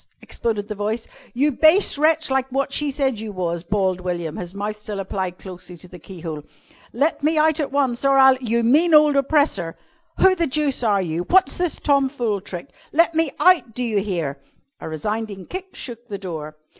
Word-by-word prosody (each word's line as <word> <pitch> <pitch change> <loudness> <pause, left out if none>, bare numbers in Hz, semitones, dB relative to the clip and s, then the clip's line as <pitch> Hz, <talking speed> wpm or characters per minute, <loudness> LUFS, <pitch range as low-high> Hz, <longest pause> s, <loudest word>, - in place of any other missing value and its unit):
exploded 215 -3 -3
the 215 - -4
voice. 215 +3 -3 0.2
"You 285 +5 +1
base 315 +9 +4
wretch, 310 0 +2
like 265 0 0
wot 275 +1 -1
she 295 0 0
said 270 -4 -1
you 220 -1 -5
was," 170 -3 -3
bawled 185 0 -1
William, 175 -3 -4
his 180 +1 -7
mouth 205 +1 -3
still 210 -1 -7
applied 190 -2 -4
closely 180 -2 -11
to 180 - -15
the 180 0 -12
keyhole. 165 -3 -7 0.5
"Let 290 +8 0
me 310 +2 +1
out 310 0 +3
at 290 -3 -2
once, 270 -4 0
or 275 0 +4
I'll 265 -1 +7
" 260 - -14
"You 235 0 +2
mean 310 +8 +4
ole 300 -1 +6
oppressor!" 275 - +1 0.4
"Who 380 - +5
the 340 -3 0
deuce 285 -1 -1
are 205 -5 +2
you? 165 0 -2
What's 380 +1 +4
this 355 -2 -2
tomfool 265 -7 0
trick? 180 -3 -8 0.2
Let 335 +2 +3
me 325 -1 +2
out! 345 - +4
Do 250 - -2
you 220 -4 0
hear?" 170 -9 -3 0.4
A - - -7
resounding 200 +4 -4
kick 375 +1 -8
shook 240 -1 -7
the 205 -3 -5
door. 155 -5 -7
230 Hz, 195 wpm, -21 LUFS, 185-290 Hz, 0.5 s, I'll